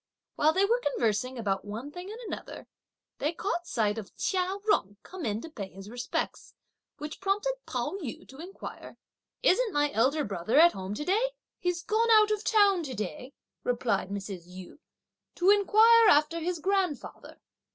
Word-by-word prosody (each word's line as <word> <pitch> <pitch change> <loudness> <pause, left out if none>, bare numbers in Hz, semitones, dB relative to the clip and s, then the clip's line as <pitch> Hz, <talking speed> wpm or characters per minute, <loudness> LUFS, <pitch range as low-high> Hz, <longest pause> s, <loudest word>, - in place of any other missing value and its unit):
While 305 +1 +4
they 380 +4 +3
were 470 +4 +2
conversing 250 -1 0
about 200 -4 -1
one 225 +7 -7
thing 355 +4 -8
and 450 - -8
another, 460 - -7 0.5
they 300 +4 0
caught 350 -1 -3
sight 215 -2 0
of 205 - -11
Chia 375 0 0
Jung 205 - +1
come 365 -6 -6
in 215 +1 -2
to 330 - -8
pay 200 -9 -6
his 195 +3 -11
respects, 245 0 -4 0.4
which 300 +3 -7
prompted 405 +6 0
Pao 390 - -3
yü 255 -8 -7
to 265 - -13
inquire, 360 +4 -9 0.5
"Isn't 475 +1 +3
my 290 -3 +1
elder 275 +7 +2
brother 200 +2 -1
at 340 +2 +8
home 190 +2 -5
to 295 - -4
day?" 455 +7 +1 0.3
"He's 355 -1 -1
gone 450 +2 +1
out 430 -1 +6
of 425 0 -1
town 405 -5 +4
to 260 -3 -5
day," 220 +6 -6 0.3
replied 230 -6 0
Mrs. 195 -3 -6
Yu, 185 +8 -11 0.6
"to 365 +3 +4
inquire 440 +3 +6
after 305 0 +4
his 345 +2 -2
grandfather. 375 -4 -2
310 Hz, 170 wpm, -29 LUFS, -, 0.6 s, at